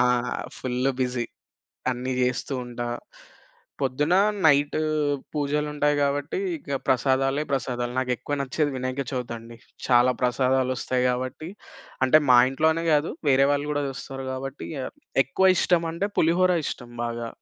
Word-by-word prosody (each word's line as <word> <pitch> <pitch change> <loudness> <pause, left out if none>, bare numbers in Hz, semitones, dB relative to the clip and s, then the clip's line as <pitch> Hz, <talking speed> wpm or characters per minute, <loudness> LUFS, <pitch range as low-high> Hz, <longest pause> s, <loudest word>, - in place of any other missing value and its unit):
ఆ! - - +5 0.5
Full 130 +1 0
busy. 125 -1 0 0.7
అన్ని 130 +1 -3
జెస్తూ 125 +2 -1
ఉంటా. 120 0 -5 1.0
పొద్దున, 145 +6 +1 0.3
నైటు 145 +1 +3 0.5
పూజలుంటాయి 150 0 0
గాబట్టి 145 +2 0 0.2
ఇక 140 -2 -4
ప్రసాదాలే 135 +2 +2
ప్రసాదాలు. 125 -2 -1
నాకెక్కువ 130 +3 -1
నచ్చేది 145 +3 0
వినాయక 130 +2 -2
చవితండి. 115 -2 -5 0.3
చాలా 125 0 +5
ప్రసాదాలొస్తాయి 130 0 +1
గాబట్టి. 130 +5 -3 0.6
అంటే 155 +4 +6
మా 125 - +8
ఇంట్లోనే 160 +4 +1
గాదు. 150 +2 +2 0.2
వేరే 135 +1 +5
వాళ్ళు 145 0 -1
కూడా 145 0 0
చూస్తారు 135 0 -7
కాబట్టి 135 +2 -6
ఇగ 135 - -3
ఆహ్, - - -43 0.3
ఎక్కువ 190 +8 +2
ఇష్టం 175 -1 +2
అంటే 195 +5 -1
పులిహోర 180 +3 +4
ఇష్టం 120 -2 -6
బాగా. 120 0 -3
135 Hz, 125 wpm, -25 LUFS, 125-145 Hz, 1.0 s, మా